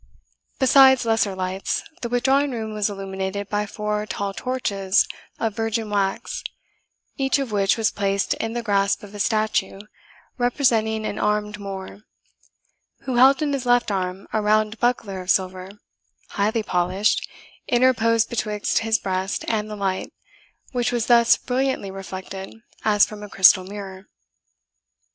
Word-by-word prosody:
Besides 265 Hz, -1 st, +6 dB
lesser 225 Hz, -3 st, +1 dB
lights, 185 Hz, +1 st, -2 dB, 0.2 s
the 235 Hz, -, -3 dB
withdrawing 265 Hz, +4 st, +2 dB
room 220 Hz, -4 st, -4 dB
was 210 Hz, -1 st, 0 dB
illuminated 195 Hz, 0 st, -4 dB
by 210 Hz, 0 st, -1 dB
four 210 Hz, 0 st, -3 dB
tall 200 Hz, -1 st, -3 dB
torches 200 Hz, -6 st, 0 dB, 0.3 s
of 220 Hz, -2 st, -1 dB
virgin 225 Hz, -1 st, -2 dB
wax, 200 Hz, -, -1 dB, 0.7 s
each 270 Hz, -1 st, +1 dB
of 270 Hz, -5 st, -3 dB
which 200 Hz, 0 st, +2 dB
was 225 Hz, -2 st, +1 dB
placed 200 Hz, -1 st, 0 dB
in 225 Hz, 0 st, -4 dB
the 240 Hz, 0 st, -3 dB
grasp 200 Hz, -2 st, +1 dB
of 205 Hz, 0 st, -11 dB
a 205 Hz, -, -8 dB
statue, 215 Hz, -2 st, 0 dB, 0.6 s
representing 230 Hz, -4 st, +1 dB
an 205 Hz, -, -3 dB
armed 210 Hz, 0 st, -1 dB
Moor, 195 Hz, -1 st, -7 dB, 1.0 s
who 260 Hz, -2 st, -3 dB
held 270 Hz, +4 st, +6 dB
in 290 Hz, -1 st, 0 dB
his 260 Hz, -3 st, -3 dB
left 245 Hz, -2 st, +3 dB
arm 185 Hz, 0 st, -3 dB
a 215 Hz, -, +1 dB
round 215 Hz, +1 st, +1 dB
buckler 225 Hz, -6 st, -1 dB
of 180 Hz, -, -10 dB
silver, 185 Hz, 0 st, 0 dB, 0.6 s
highly 215 Hz, +3 st, 0 dB
polished, 185 Hz, +2 st, 0 dB, 0.4 s
interposed 230 Hz, -2 st, +3 dB
betwixt 210 Hz, -3 st, -1 dB
his 225 Hz, 0 st, +1 dB
breast 190 Hz, -1 st, -2 dB
and 215 Hz, -1 st, -1 dB
the 210 Hz, -, -5 dB
light, 195 Hz, -2 st, -2 dB, 0.6 s
which 245 Hz, -2 st, 0 dB
was 240 Hz, -2 st, 0 dB
thus 235 Hz, -1 st, +5 dB
brilliantly 255 Hz, -5 st, -2 dB
reflected 190 Hz, 0 st, -7 dB, 0.3 s
as 210 Hz, -1 st, +5 dB
from 210 Hz, -1 st, -10 dB
a 210 Hz, -, -8 dB
crystal 190 Hz, -1 st, +6 dB
mirror. 195 Hz, 0 st, -9 dB
210 Hz, 145 wpm, -23 LUFS, 195-235 Hz, 1.0 s, Besides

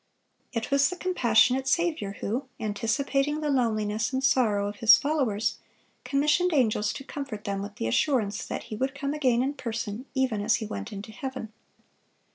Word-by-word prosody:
(565) 230 Hz, -2 st, -1 dB
It 250 Hz, -, -6 dB
was 280 Hz, 0 st, +4 dB
the 365 Hz, -, -5 dB
compassionate 260 Hz, -7 st, +3 dB
Saviour, 315 Hz, -, 0 dB
who, 245 Hz, +7 st, -2 dB
anticipating 275 Hz, +7 st, 0 dB
the 300 Hz, -1 st, 0 dB
loneliness 220 Hz, -4 st, 0 dB
and 260 Hz, 0 st, -1 dB
sorrow 225 Hz, -7 st, +3 dB
of 205 Hz, 0 st, -6 dB
His 230 Hz, +1 st, +8 dB
followers, 265 Hz, -8 st, 0 dB, 0.4 s
commissioned 300 Hz, +6 st, +2 dB
angels 215 Hz, -5 st, +2 dB
to -, -, -7 dB
comfort 270 Hz, -7 st, -6 dB
them 200 Hz, -1 st, -2 dB
with 205 Hz, +1 st, -7 dB
the -, -, -3 dB
assurance 210 Hz, -, +1 dB
that -, -, -4 dB
He 215 Hz, -, -7 dB
would 265 Hz, +4 st, -2 dB
come 280 Hz, 0 st, -2 dB
again 255 Hz, -5 st, +2 dB
in 275 Hz, +2 st, -1 dB
person, 230 Hz, -1 st, -5 dB
even 260 Hz, -6 st, +1 dB
as 220 Hz, +3 st, +3 dB
He 220 Hz, -, -3 dB
went 100 Hz, -, -6 dB
into 205 Hz, +2 st, -7 dB
heaven. 260 Hz, -2 st, -6 dB
245 Hz, 175 wpm, -27 LUFS, 215-275 Hz, 0.4 s, His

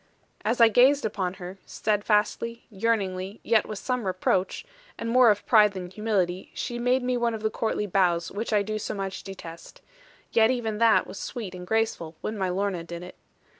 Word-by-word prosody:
As 230 Hz, +3 st, 0 dB
I 230 Hz, -, +9 dB
gazed 260 Hz, +5 st, +4 dB
upon 190 Hz, -4 st, -2 dB
her, 185 Hz, +1 st, -9 dB
steadfastly, 210 Hz, +2 st, 0 dB
yearningly, 195 Hz, -2 st, -1 dB
yet 225 Hz, -1 st, +3 dB
with 215 Hz, -, -5 dB
some 250 Hz, -2 st, -2 dB
reproach, 185 Hz, -, 0 dB, 0.3 s
and 230 Hz, -, -4 dB
more 250 Hz, -1 st, +6 dB
of 205 Hz, -1 st, +1 dB
pride 210 Hz, -3 st, +5 dB
than 180 Hz, -2 st, -6 dB
humility, 190 Hz, -4 st, -1 dB
she 240 Hz, 0 st, -4 dB
made 250 Hz, +1 st, +2 dB
me 250 Hz, 0 st, 0 dB
one 235 Hz, -1 st, 0 dB
of 220 Hz, -, -8 dB
the 220 Hz, -, +1 dB
courtly 220 Hz, -2 st, -1 dB
bows 175 Hz, -3 st, +1 dB
which 220 Hz, +4 st, -4 dB
I 210 Hz, -1 st, +3 dB
do 215 Hz, +1 st, -3 dB
so 215 Hz, -, -4 dB
much 195 Hz, -1 st, -4 dB
detest; 170 Hz, -4 st, -10 dB, 0.5 s
yet 225 Hz, 0 st, +5 dB
even 225 Hz, -4 st, -1 dB
that 230 Hz, -1 st, +5 dB
was -, -, -9 dB
sweet 215 Hz, -7 st, -5 dB
and 180 Hz, 0 st, -8 dB
graceful, 220 Hz, -7 st, -1 dB
when 215 Hz, -, -3 dB
my 190 Hz, -3 st, -1 dB
Lorna 185 Hz, -1 st, -1 dB
did 170 Hz, +1 st, -7 dB
it. 180 Hz, -, -9 dB
210 Hz, 190 wpm, -26 LUFS, 185-230 Hz, 0.5 s, I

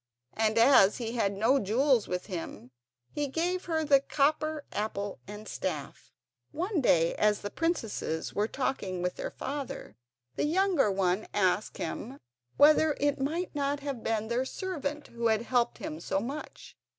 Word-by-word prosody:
And 220 Hz, 0 st, +1 dB
as 230 Hz, -4 st, +6 dB
he 230 Hz, -2 st, -3 dB
had 225 Hz, -5 st, +1 dB
no 225 Hz, +8 st, +3 dB
jewels 245 Hz, +3 st, +2 dB
with 180 Hz, 0 st, -3 dB
him, 165 Hz, -, -7 dB, 0.4 s
he 295 Hz, -1 st, -2 dB
gave 350 Hz, +6 st, -1 dB
her 320 Hz, -2 st, 0 dB
the 285 Hz, -2 st, +5 dB
copper 305 Hz, +2 st, 0 dB
apple 205 Hz, -4 st, -3 dB
and 210 Hz, +1 st, -9 dB
staff. -, -, -5 dB, 0.4 s
One 350 Hz, +2 st, -1 dB
day, 165 Hz, -9 st, +3 dB
as 210 Hz, -1 st, +2 dB
the 205 Hz, -, -5 dB
princesses 225 Hz, -, -2 dB
were 210 Hz, +1 st, +1 dB
talking 195 Hz, -9 st, -2 dB
with 180 Hz, -, -2 dB
their -, -, -3 dB
father, 280 Hz, -1 st, -6 dB, 0.4 s
the -, -, +1 dB
younger 355 Hz, -, +3 dB
one 190 Hz, +1 st, 0 dB
asked 200 Hz, +1 st, +1 dB
him 255 Hz, +5 st, -5 dB, 0.4 s
whether 305 Hz, +1 st, +5 dB
it 285 Hz, 0 st, +1 dB
might 330 Hz, +6 st, -2 dB
not 285 Hz, -1 st, -1 dB
have 275 Hz, -5 st, -4 dB
been 220 Hz, -1 st, -1 dB
their 235 Hz, +3 st, 0 dB
servant 300 Hz, -2 st, -4 dB
who 235 Hz, 0 st, -1 dB
had 220 Hz, 0 st, +2 dB
helped 240 Hz, -1 st, +1 dB
him 155 Hz, -, -6 dB
so 190 Hz, -, -1 dB
much. 275 Hz, +8 st, -7 dB
250 Hz, 160 wpm, -29 LUFS, 210-295 Hz, 0.4 s, as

